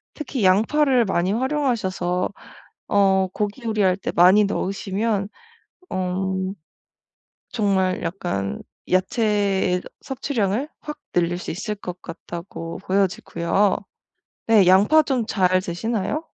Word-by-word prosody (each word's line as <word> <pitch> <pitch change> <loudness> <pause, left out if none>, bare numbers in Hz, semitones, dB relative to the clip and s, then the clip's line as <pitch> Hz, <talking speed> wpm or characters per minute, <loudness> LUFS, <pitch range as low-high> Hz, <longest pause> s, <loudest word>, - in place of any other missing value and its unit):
특히 275 -7 -4
양파를 245 +7 +3
많이 185 -1 0
활용하셔서 225 -9 0 0.6
어 190 -2 +3
고기 210 +5 -3
요리할 205 -5 +2
때 195 - -4
많이 190 +4 +6
넣으시면 200 +1 -2 0.6
어 185 0 -2 1.3
정말 195 -5 +1
약간 130 - -3 0.3
야채 195 -1 +1 0.2
섭취량을 255 -1 -2
확 300 - -7 0.2
늘릴 175 0 +1
수 - - -5
있을 210 +5 -4
것 180 -3 -8
같다고 170 0 -7
보여지고요. 195 0 +1 0.7
네. 210 -5 +6
양파 205 +13 +6
좀 255 -6 -1
잘 185 -3 +2
드시나요? 220 - -2
195 Hz, 220 characters per minute, -22 LUFS, 185-225 Hz, 1.3 s, 많이